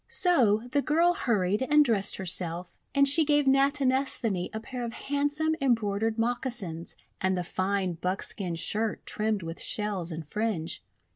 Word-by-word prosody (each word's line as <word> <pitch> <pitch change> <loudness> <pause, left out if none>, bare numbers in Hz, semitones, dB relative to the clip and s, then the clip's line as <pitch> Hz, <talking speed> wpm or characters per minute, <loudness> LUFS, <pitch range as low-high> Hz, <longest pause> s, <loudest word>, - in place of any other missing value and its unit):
5 - - -25
So 245 - +4
the 285 +1 +2
girl 335 +5 +3
hurried 210 - 0
and 295 +3 +4
dressed 210 -5 +1
herself, 175 -1 -2 0.2
and 280 0 +5
she 290 +4 +5
gave 295 -1 +2
Natinesthani 270 -7 +2
a 220 - -4
pair 245 +2 -6
of 230 -1 -4
handsome 290 +4 -1
em 260 -3 +4
broidered 220 +1 -2
moccasins 225 -8 -3 0.3
and 190 0 +1
the 180 - -1
fine 185 +1 -1
buckskin 185 -1 -1
shirt 215 +6 -2
trimmed 215 -3 -1
with 165 0 -6
shells 200 -5 -2
and 160 -2 -6
fringe. 200 - -2
220 Hz, 155 wpm, -28 LUFS, 185-275 Hz, 0.3 s, and